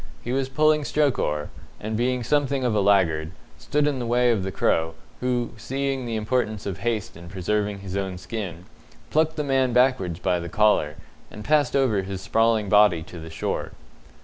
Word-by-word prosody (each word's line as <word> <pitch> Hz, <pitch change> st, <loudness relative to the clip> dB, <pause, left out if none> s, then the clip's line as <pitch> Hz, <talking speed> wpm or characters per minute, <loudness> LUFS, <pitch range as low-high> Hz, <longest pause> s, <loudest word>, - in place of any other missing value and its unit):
He 120 Hz, -, -4 dB
was 135 Hz, 0 st, 0 dB
pulling 155 Hz, +2 st, +3 dB
stroke 145 Hz, -1 st, +1 dB
oar, 75 Hz, 0 st, -1 dB, 0.3 s
and, 110 Hz, +1 st, -4 dB
being 125 Hz, +2 st, 0 dB
something 140 Hz, 0 st, +1 dB
of 120 Hz, -3 st, +1 dB
a 105 Hz, -, +2 dB
laggard, 90 Hz, -6 st, +3 dB, 0.3 s
stood 150 Hz, 0 st, 0 dB
in 145 Hz, -3 st, 0 dB
the 120 Hz, -, -3 dB
way 120 Hz, +1 st, +3 dB
of 110 Hz, -4 st, +1 dB
the 95 Hz, +1 st, -3 dB
Crow, 80 Hz, -2 st, +1 dB, 0.2 s
who, 125 Hz, -1 st, -1 dB
seeing 135 Hz, +2 st, -2 dB
the 115 Hz, -, -2 dB
importance 110 Hz, -1 st, -1 dB
of 95 Hz, -4 st, -4 dB
haste 115 Hz, -4 st, -2 dB
in 85 Hz, +1 st, -11 dB
preserving 100 Hz, +2 st, -1 dB
his 95 Hz, -1 st, -6 dB
own 95 Hz, -2 st, -2 dB
skin, 90 Hz, -4 st, -6 dB, 0.5 s
plucked 160 Hz, +1 st, +2 dB
the 150 Hz, -, -1 dB
man 135 Hz, -3 st, +1 dB
backwards 125 Hz, -9 st, +2 dB
by 90 Hz, 0 st, 0 dB
the 85 Hz, 0 st, -6 dB
collar, 105 Hz, -7 st, +2 dB, 0.3 s
and 105 Hz, -, -10 dB
passed 150 Hz, -3 st, +2 dB
over 125 Hz, -8 st, +2 dB
his 95 Hz, 0 st, -5 dB
sprawling 110 Hz, +1 st, +2 dB
body 100 Hz, -5 st, +5 dB
to 85 Hz, +1 st, -10 dB
the 80 Hz, 0 st, -8 dB
shore. 80 Hz, -, -3 dB
110 Hz, 190 wpm, -24 LUFS, 95-130 Hz, 0.5 s, body